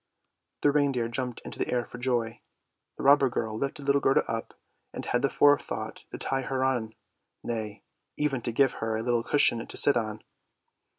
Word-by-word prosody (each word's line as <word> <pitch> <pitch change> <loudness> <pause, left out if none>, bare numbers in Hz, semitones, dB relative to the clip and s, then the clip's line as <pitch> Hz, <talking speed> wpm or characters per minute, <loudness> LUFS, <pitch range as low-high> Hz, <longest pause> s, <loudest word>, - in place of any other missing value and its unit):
" - - -55
The 145 - +5
reindeer 140 -5 +1
jumped 125 0 -2
into - - -8
the - - -1
air 120 -1 -1
for 125 - -11
joy. 120 -2 -1 0.6
The - - -6
robber 140 -1 +5
girl 110 -2 -3
lifted 140 +4 -4
little 140 0 +2
Gerda 135 - +3
up, 115 0 -5 0.4
and - - -6
had 120 - 0
the 140 - +1
forethought 145 +1 +1
to - - -6
tie 135 0 -1
her 130 0 -2
on, 120 -4 -1 0.5
nay, 110 -2 -5 0.3
even 140 -4 -1
to 120 - -2
give 135 +3 +3
her 110 0 -1
a 110 - -4
little 120 -1 +1
cushion 120 -2 +4
to - - -3
sit 145 - +7
upon. 110 -2 -3
125 Hz, 190 wpm, -27 LUFS, 115-140 Hz, 0.6 s, sit